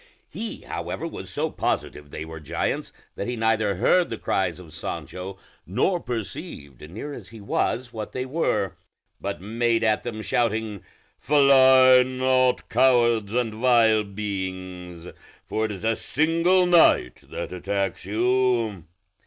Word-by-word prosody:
He 225 0 -6
however - - -5
was - - -7
so - - -2
positive 75 -1 -3
they 75 +2 -6
were 80 0 -8
giants 75 - -3 0.2
that 100 - -4
he 125 - -2
neither 110 -3 +1
heard 175 - +3
the - - -4
cries 90 -3 -1
of 80 -4 -13
Sancho, 90 +3 -6 0.3
nor 175 - +1
perceived, 95 - -6
near 115 - -7
as - - -9
he 115 - -12
was, 120 +4 -2
what 110 -2 -6
they 130 0 -3
were; 130 - 0 0.5
but 100 -2 -4
made 115 +3 0
at 110 -1 +2
them, 110 -3 -6
shouting, 110 -5 -1 0.4
"Fly 130 -2 +6
not, 130 0 +1
cowards 120 -4 +3
and 120 -3 0
vile 115 -2 +4
beings, 95 -4 -6 0.4
for 110 - -1
it 110 - -3
is 100 -1 -8
a 115 0 +2
single 165 +7 +2
knight 170 - +4
that - - -5
attacks 95 +1 -2
you!" 115 -2 +1
110 Hz, 140 wpm, -24 LUFS, 95-130 Hz, 0.5 s, Fly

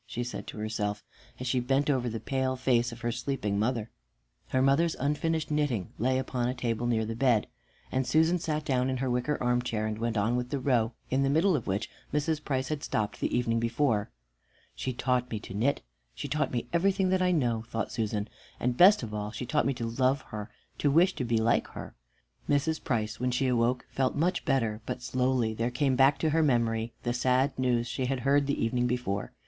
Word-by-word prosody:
she 120 - -3
said 125 - -6
to - - -8
herself, 105 -1 -2 0.4
as 125 - -5
she 130 0 +1
bent 135 +3 +1
over 130 -4 +1
the 115 0 -4
pale 130 0 -1
face 125 -2 +1
of 115 0 -10
her 120 -1 -1
sleeping 120 -5 -2
mother. 115 0 -1 0.6
Her 130 - 0
mother's 140 +5 +3
unfinished 155 +3 -1
knitting 145 - 0
lay 130 +3 +2
upon 125 -2 -1
a 125 - -2
table 120 -1 -1
near 110 -2 +1
the 115 +1 -4
bed, 120 -3 +3 0.5
and 130 - +1
Susan 160 +6 +3
sat 155 -2 -2
down 130 -2 +1
in 130 - -1
her 130 0 -1
wicker 125 +4 0
armchair, 120 -3 0
and 110 0 -3
went 115 -1 -1
on 110 +4 +1
with 125 0 -2
the 140 - -1
row, 125 -4 +1 0.2
in 130 +1 +2
the 135 - +2
middle 165 +6 +3
of 130 - -3
which 100 +3 -1 0.2
Mrs. 150 +1 0
Price 130 -2 -1
had 150 -2 -2
stopped 105 -6 -2
the - - 0
evening 115 -1 +1
before. 115 -2 +1 0.6
"She 130 - -3
taught 125 0 0
me 110 - -3
to - - -9
knit, 125 +8 0 0.3
she 145 - -5
taught 150 0 0
me 120 -1 -2
everything 190 +2 +2
that 185 0 +2
I 180 0 +3
know," 120 -9 +1
thought 115 -1 -3
Susan, 105 -2 -2 0.3
"and 125 0 0
best 185 +2 +7
of 110 -2 -6
all, 105 0 -3
she 120 +3 -5
taught 150 +4 +1
me 135 - +1
to 120 -2 -3
love 130 +4 +1
her, 105 -1 -6 0.3
to 145 - +2
wish 175 +6 +4
to 135 - -3
be 115 -1 +1
like 115 +1 +2
her." - - -9 0.6
Mrs. 145 +2 +1
Price, 110 -3 -1
when 125 +1 0
she 125 +2 0
awoke, 125 0 +1
felt 130 -1 0
much 170 +5 0
better, 115 -8 0
but 125 - -4
slowly 125 -3 +1
there 115 +2 -1
came 130 +1 +1
back 135 +2 +5
to 155 - 0
her 160 +2 +3
memory 115 -5 +1
the 120 - 0
sad 130 +2 +2
news 120 -2 +2
she 130 +1 -2
had 130 -1 -1
heard 140 +2 +3
the 140 - 0
evening 125 +1 +1
before. 120 -5 -2
125 Hz, 220 wpm, -29 LUFS, 115-140 Hz, 0.6 s, best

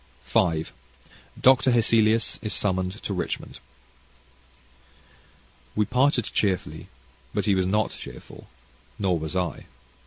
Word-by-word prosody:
CHAPTER 80 -2 +2
V - - -13 0.7
Dr. 130 0 +5
Hesselius 115 -2 +3
is 110 - -1
Summoned 95 0 -1
to 100 - -3
Richmond 90 - -4 2.2
We 105 - +2
parted 130 -1 +2
cheerfully, 95 -3 -1 0.5
but - - 0
he 100 - +3
was 95 -1 +1
not 105 +2 +1
cheerful, - - -11 0.5
nor 90 -4 0
was 80 +2 -5
I. 90 -2 -2
105 Hz, 115 wpm, -25 LUFS, 90-115 Hz, 2.2 s, Dr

